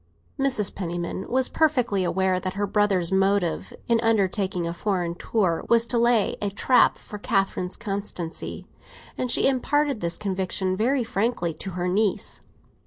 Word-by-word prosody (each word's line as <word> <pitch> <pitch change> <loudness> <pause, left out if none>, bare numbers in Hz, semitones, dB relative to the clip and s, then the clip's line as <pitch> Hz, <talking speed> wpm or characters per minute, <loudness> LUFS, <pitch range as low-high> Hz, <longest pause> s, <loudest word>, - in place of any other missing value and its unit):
Mrs. 255 -7 +1
Penniman 175 0 -4
was 260 +1 +2
perfectly 250 -11 +1
aware 185 +1 +1
that 185 +1 -4
her 205 +1 0
brother's 195 -4 +1
motive 195 -2 +1 0.2
in 235 -1 +3
undertaking 195 -5 +1
a 170 - -2
foreign 175 -2 -1
tour 175 -2 0
was 230 0 +4
to 235 0 0
lay 235 -3 +2
a 205 - 0
trap 245 +5 +3
for 210 - -9
Catherine's 195 -2 -1
constancy; 195 -5 -4 0.5
and 255 - -2
she - - +4
imparted 275 0 +1
this 170 0 -1
conviction 190 -2 -1
very 245 +6 +1
frankly 220 -6 -1
to 185 +4 -6
her 180 0 -1
niece. 200 +2 0
200 Hz, 150 wpm, -25 LUFS, 185-230 Hz, 0.5 s, was